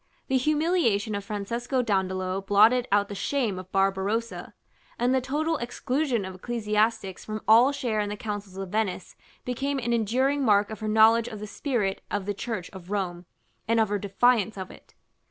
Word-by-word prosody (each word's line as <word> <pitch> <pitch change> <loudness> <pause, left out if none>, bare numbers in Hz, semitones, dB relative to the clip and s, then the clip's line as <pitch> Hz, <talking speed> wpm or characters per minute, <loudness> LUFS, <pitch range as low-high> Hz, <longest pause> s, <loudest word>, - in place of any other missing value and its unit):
The 265 - +3
humiliation 295 - +1
of 200 0 -3
Francesco 235 +6 -2
Dandolo 190 -3 -1
blotted 215 +5 +4
out 205 0 +3
the 205 - -7
shame 210 -1 -1
of 185 0 -11
Barbarossa, 195 +4 -1 0.4
and 245 +2 +2
the 260 - +2
total 305 +5 -1
exclusion 250 -1 -1
of 190 - -6
ecclesiastics 215 -1 -1
from 215 0 -5
all 235 +5 +7
share 245 -6 -2
in 205 -1 -1
the 210 - -5
councils 205 -3 -6
of 195 -1 -5
Venice 200 -3 -2 0.3
became 275 +3 -2
an 240 -2 -1
enduring 260 +6 +1
mark 205 -3 +3
of 220 - -6
her 215 - -4
knowledge 220 +2 +5
of 220 -3 -7
the 210 - -6
spirit 210 -3 -2
of 205 -2 -2
the 205 - -1
Church 205 -2 -4
of 190 -2 -11
Rome, 180 -4 -3 0.4
and 230 +1 +2
of 220 - +2
her 205 0 -1
defiance 215 +2 +2
of 185 -1 -6
it. - - -17
215 Hz, 180 wpm, -26 LUFS, 200-245 Hz, 0.4 s, all